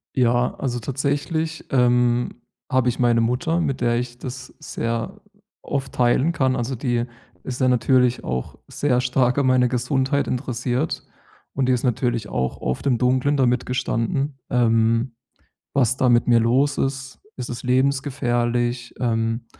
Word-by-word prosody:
Ja, 120 -1 +2
also, 125 -3 -3
tatsächlich, 145 +6 -2
ähm, 125 -1 +2 0.3
habe 130 -1 +2
ich 125 - -3
meine 120 -2 +3
Mutter, 135 +9 0
mit 135 -4 -1
der 120 0 +2
ich 120 0 -4
das 130 +1 -7
sehr 115 0 -4 0.4
oft 135 -1 -3
teilen 125 +6 +2
kann. 130 -4 +1
Also, 125 +1 -2
die 120 -1 -1 0.4
ist 130 +1 -5
ja 130 - +4
natürlich 125 0 +2
auch 65 0 -4
sehr 125 -4 0
stark 125 0 +1
an 140 -2 +2
meine 125 -1 +4
Gesundheit 135 +3 0
interessiert. 125 +3 -2 0.5
Und 135 -1 0
die 130 - +4
ist 125 - -1
natürlich 120 -2 0
auch 65 0 -2
oft 65 - -3
im 125 -3 +3
Dunklen 130 +3 +2
damit 125 -1 +2
gestanden, 130 +2 -1
ähm, 115 0 +2 0.6
was 130 -2 +2
da 125 - +3
mit 120 0 +3
mir 120 -1 +5
los 130 +5 +2
ist. 135 -1 -3 0.2
Ist 125 - -5
es 120 0 -6
lebensgefährlich? 125 -2 0
Ähm, 115 -1 -1
125 Hz, 150 wpm, -22 LUFS, 120-135 Hz, 0.6 s, mir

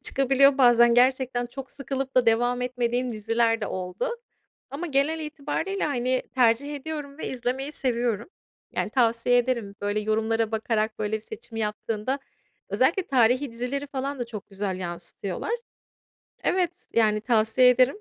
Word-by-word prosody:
çıkabiliyor. 275 +1 +3
Bazen 240 -2 +6
gerçekten 250 0 +2
çok 265 +2 -9
sıkılıp 270 -1 -4
da 255 - +5
devam 245 +2 +2
etmediğim 250 0 -1
diziler 225 +1 +1
de - - -2
oldu 180 0 -3 0.6
ama 290 +6 -4
genel 300 +2 +1
itibariyle, 310 +6 -3
hani, 255 -2 0
tercih 260 +4 +3
ediyorum 290 0 -6
ve - - -4
izlemeyi 260 +3 -3
seviyorum. 235 - -1 0.4
Yani, - - -2
tavsiye 235 -1 +3
ederim. 235 -5 -1
Böyle, 205 +1 0
yorumlara 220 +1 0
bakarak 220 0 -1
böyle 215 0 -1
bir - - -8
seçim 225 +1 -9
yaptığında 215 +4 -2 0.5
Özellikle 385 - +2
tarihî 255 +1 +3
dizileri 250 +5 -3
falan 275 0 -4
da 245 - -3
çok 215 -4 -8
güzel 195 -1 -3
yansıtıyorlar. 175 - -5 0.9
Evet, 360 -2 +1 0.2
yani, 215 -2 +3
tavsiye 230 +2 +4
ederim. 255 - +3
245 Hz, 140 wpm, -26 LUFS, 225-270 Hz, 0.9 s, Bazen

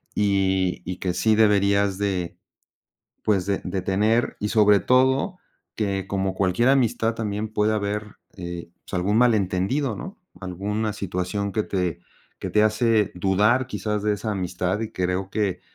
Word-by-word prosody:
-y 95 -2 +1
y 90 0 -4
que 90 -1 -2
sí 110 +4 +2
deberías 100 -2 +3
de 95 -4 -2 0.9
pues 100 -4 +1
de 100 -1 0
de 95 +1 -2
tener 105 +5 +1
y 105 - -1
sobre 105 -2 +5
todo 130 +8 +2 0.4
que, 100 -3 -2
como 95 -1 -1
cualquier 95 +6 +2
amistad 120 -4 +2
también 105 -1 -3
puede 105 0 +2
haber, 105 0 -3 0.2
eh, 85 -2 -6
pues - - -9
algún 95 +4 +1
malentendido, 110 +2 +1
¿no?, 190 - -8 0.2
alguna 105 +4 -3
situación 100 +1 -3
que 110 - 0
te 90 -4 -2 0.4
que - - -5
te 105 - +3
hace 110 -1 +2
dudar 105 +8 +2
quizás 105 -4 -3
de 105 0 +1
esa 110 +2 -4
amistad 90 0 -2
y 110 -1 -4
creo 90 0 -1
que 100 -4 -1
100 Hz, 150 wpm, -24 LUFS, 95-110 Hz, 0.9 s, sobre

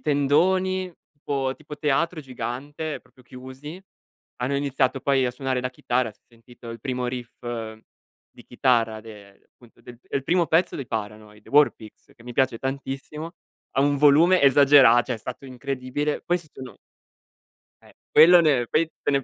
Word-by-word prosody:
tendoni 185 +6 +1 0.2
tipo 135 -2 -3
tipo 150 -1 -10
teatro 155 +3 0
gigante, 145 +4 -6
proprio 125 0 -24
chiusi, 130 +8 -10 0.5
hanno 130 +3 -2
iniziato 135 -1 0
poi 135 0 +2
a 125 - 0
suonare 130 0 -3
la 125 - -3
chitarra, 120 -2 -2
si - - -36
è - - -56
sentito 120 0 -16
il 115 -1 -8
primo 125 -1 -3
riff 125 -1 -6 1.0
di - - -16
chitarra 115 -3 +1
de 105 -3 -14
appunto, 120 -2 -22
del 120 -1 -13
il 140 - -1
primo 175 +4 +1
pezzo 165 +4 +1
dei 135 - -6
Paranoid, 105 -1 -7
War 145 +1 +5
Pigs, 110 -2 -16
che 115 - -19
mi 125 - -8
piace 130 -3 +1
tantissimo, 140 +4 -5 0.4
a 135 - +4
un 145 0 +2
volume 150 +6 +5
esagera 135 -3 +6
cioè 125 - -4
è - - -14
stato 125 +4 -8
incredibile. 130 +3 -4
Questo 175 -5 -3
no 130 - -10 1.1
Eh, - - -20 0.2
quello 170 +3 +8
ne 135 -7 +2
poi 155 +5 +1
te - - -1
ne 140 -1 +1
135 Hz, 160 wpm, -24 LUFS, 125-150 Hz, 1.1 s, quello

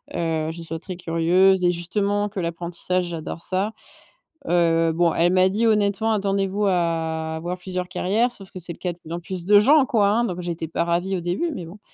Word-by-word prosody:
heu, 160 -2 -1
je 170 +1 -8
sois 165 0 -5
très 185 +2 -7
curieuse 180 +2 +3
et 175 - +4
justement 200 +4 0
que 200 -1 -6
l'apprentissage, 175 +1 -2
j'adore 165 -1 -6
ça. 190 +4 -1 0.8
Heu, 165 -1 +3
bon, 170 0 +2
elle 175 +2 +2
m'a 185 0 +5
dit 215 +4 0
honnêtement: 210 0 +2
«Attendez-vous 200 0 0
à 165 -3 -1
avoir 175 +3 -4
plusieurs 180 0 -4
carrières», 215 +7 +1
sauf 195 -5 -10
que 185 - -8
c'est 175 0 -5
le - - -15
cas 180 -2 -2
de 170 - -22
plus 160 - -12
en 170 - -3
plus 180 -1 -6
de 205 +2 +7
gens 285 +7 +5
quoi 220 -7 +2
hein. 230 +3 +2
Donc, 180 -5 -4
j'étais 170 -2 -4
pas 160 - -1
ravie 175 +3 0
au - - -4
début, 180 - -1
mais 175 - -6
bon. 175 +6 -12
180 Hz, 215 wpm, -23 LUFS, 170-200 Hz, 0.8 s, de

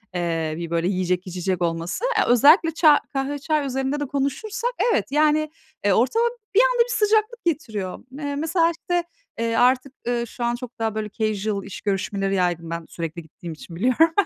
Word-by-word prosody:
Eee, 165 -3 -1
bir, 170 -1 -5
böyle, 170 +1 0
yiyecek, 185 -1 -1
içecek 180 0 -2
olması. 170 - -2
Eee, - - +4
özellikle 300 - +6
ça 310 -3 +6
kahve, 275 +1 -2
çay 305 -1 0
üzerinde 270 +2 -1
de 290 - -1
konuşursak 285 - -2 0.2
evet, - - 0
yani, 305 +1 +3 0.4
eee, 200 - +4
ortama 350 - +2 0.3
bir - - +7
anda - - +4
bir 485 - -7
sıcaklık 435 +1 +1
getiriyor. 220 - -2
Me 285 +1 -4
mesela 330 +3 +2
işte, 350 +1 -2 0.4
eee, 230 0 0
artık, 255 +2 +3
ııı, 240 -1 0
şu 245 +1 -7
an 235 0 +1
çok 250 -1 -9
daha, 220 -1 -1
böyle, 215 -1 -3
casual 210 -2 -1
iş 200 - -8
görüşmeleri 195 0 -1
yaydım 175 -2 0
ben 170 -1 -4
sürekli 165 0 -5
gittiğim 165 +2 -9
için 165 +2 -11
biliyorum. 255 - +3
240 Hz, 180 wpm, -23 LUFS, 185-305 Hz, 0.4 s, bir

